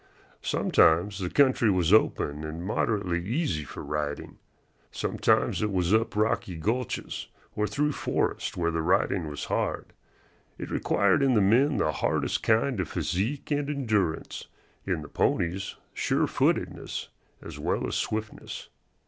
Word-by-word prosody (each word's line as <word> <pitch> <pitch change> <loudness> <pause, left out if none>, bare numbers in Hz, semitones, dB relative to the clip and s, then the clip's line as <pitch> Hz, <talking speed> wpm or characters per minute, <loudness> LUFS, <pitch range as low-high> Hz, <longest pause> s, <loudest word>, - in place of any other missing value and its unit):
Sometimes 90 +5 +3
the 90 -2 -2
country 130 -4 +4
was 90 -2 +2
open 75 -8 +2
and 80 +3 -5
moderately 95 -4 0
easy 105 - -1
for 70 - -8
riding. 75 -1 -4 0.5
Sometimes - - +1
it 105 -1 0
was 90 0 +1
up 115 0 +2
rocky 105 -4 0
gulches 115 +8 -2 0.3
or 105 0 0
through 150 +9 0
forests - - -1
where 85 -1 +1
the 80 0 -1
riding 90 0 +1
was 75 -1 -5
hard. - - -2 0.6
It - - -7
required 100 +6 +2
in 135 -2 +3
the - - +5
men 120 +8 +4
the 75 - +2
hardest - - 0
kind 115 +1 +2
of 90 - -2
physique 95 - -2
and 145 -1 0
endurance, 110 - -1 0.4
in 85 -5 -1
the - - -9
ponies 95 +7 0 0.2
surefootedness - - 0 0.3
as - - -8
well - - -1
as - - -3
swiftness. 110 0 -4
100 Hz, 140 wpm, -27 LUFS, 85-115 Hz, 0.6 s, the